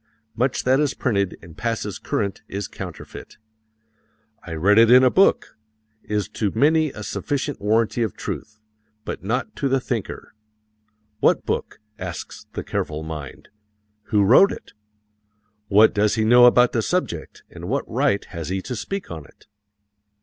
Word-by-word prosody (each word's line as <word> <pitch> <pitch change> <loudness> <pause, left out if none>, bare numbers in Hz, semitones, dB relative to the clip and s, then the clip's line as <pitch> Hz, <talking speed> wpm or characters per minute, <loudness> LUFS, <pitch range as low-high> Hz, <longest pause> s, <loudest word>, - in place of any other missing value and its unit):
Much 125 +3 0
that 130 +2 +3
is 150 -2 0
printed 100 -7 -1
and 85 -2 -14
passes 115 -4 -3
current 100 -2 -2
is 100 -1 -4
counterfeit. - - -9 1.1
"I 85 - -7
read 100 +7 +4
it 115 0 +6
in 125 +1 +8
a 130 - +5
book" 195 - +3 0.5
is 105 -2 -2
to 105 -1 -1
many 155 +5 +3
a 105 - -8
sufficient 145 +4 -3
warranty 110 +3 +1
of 110 -5 -2
truth, 110 0 -6 0.5
but - - -6
not 125 - -2
to 140 - 0
the 135 0 +2
thinker. 120 -5 -5 0.9
"What - - +2
book?" - - -3 0.2
asks 90 -2 -7
the - - -4
careful 75 0 -3
mind. 75 -4 -8 0.6
"Who 105 -1 +2
wrote 130 - +6
it? - - -10 0.9
What 105 +2 +5
does 105 0 +2
he 110 -1 +1
know 120 +2 +7
about 125 0 +5
the 115 - 0
subject 110 - -3
and 85 +2 -8
what 140 +3 -1
right 130 -3 0
has 85 -5 -7
he 95 +1 -1
to 125 - -5
speak 195 - -5
on 80 -3 -7
it? - - -22
110 Hz, 155 wpm, -22 LUFS, 100-130 Hz, 1.1 s, in